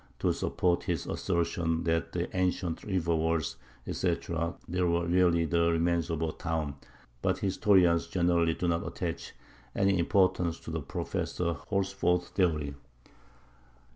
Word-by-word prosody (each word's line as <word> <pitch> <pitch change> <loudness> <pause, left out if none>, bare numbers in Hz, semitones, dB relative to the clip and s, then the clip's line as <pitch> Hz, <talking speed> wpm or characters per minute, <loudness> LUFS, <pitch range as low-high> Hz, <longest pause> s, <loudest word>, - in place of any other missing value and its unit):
to - - +1
support 90 -1 0
his 85 -5 -1
assertion 85 -1 -1
that 80 -3 0
the - - -2
ancient 90 -2 0
river 85 -4 0
walls, 80 -1 0 0.3
etc., 85 +1 -1
there 90 +1 0
were 85 0 +1
really 85 -1 +3
the 85 +1 +2
remains 85 0 +1
of 80 -1 -1
a 80 - 0
town; 80 -4 -3 0.5
but - - +1
historians 95 -4 +3
generally 85 -2 +2
do 90 - -2
not 85 -1 +1
attach - - -4 0.4
any 95 -1 +3
importance 90 -2 +2
to - - -8
Professor 85 +4 -2 0.2
Horsford's 95 -3 +1
theory. 75 -7 0
85 Hz, 130 wpm, -30 LUFS, 80-90 Hz, 0.5 s, really